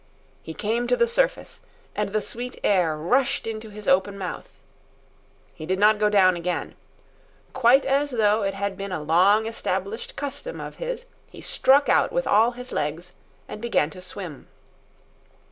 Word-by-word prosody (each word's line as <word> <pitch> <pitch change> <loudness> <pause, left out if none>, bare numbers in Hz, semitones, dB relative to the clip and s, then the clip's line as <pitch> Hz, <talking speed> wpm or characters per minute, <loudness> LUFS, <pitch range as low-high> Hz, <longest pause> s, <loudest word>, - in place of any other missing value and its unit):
He 160 - -9
came 230 +3 -1
to 245 - +2
the - - +4
surface, 475 +2 -1 0.3
and 210 -1 -1
the 215 +1 -1
sweet 245 +1 -6
air 175 -6 +2
rushed 250 - +1
into 220 0 -5
his 210 0 -10
open 195 +2 +2
mouth. 185 -3 -6 1.0
He 155 - -9
did 185 +1 0
not 210 +1 +4
go 210 0 +3
down 190 -3 +4
again. 175 +1 -3 0.8
Quite 260 +1 +4
as 280 +2 +1
though 220 -3 +2
it 195 -1 -1
had 200 0 -3
been 200 0 -6
a 180 - -2
long 190 +8 +4
established 210 -1 -3
custom 290 - -5
of - - -8
his - - -5 0.2
he - - -13
struck 280 +2 +3
out - - +3
with - - -1
all 225 +4 +4
his 250 +1 -9
legs 160 +4 -3 0.3
and 210 - -8
began 230 -10 +1
to 185 - -11
swim. 180 -5 -8
210 Hz, 165 wpm, -24 LUFS, 185-245 Hz, 1.0 s, the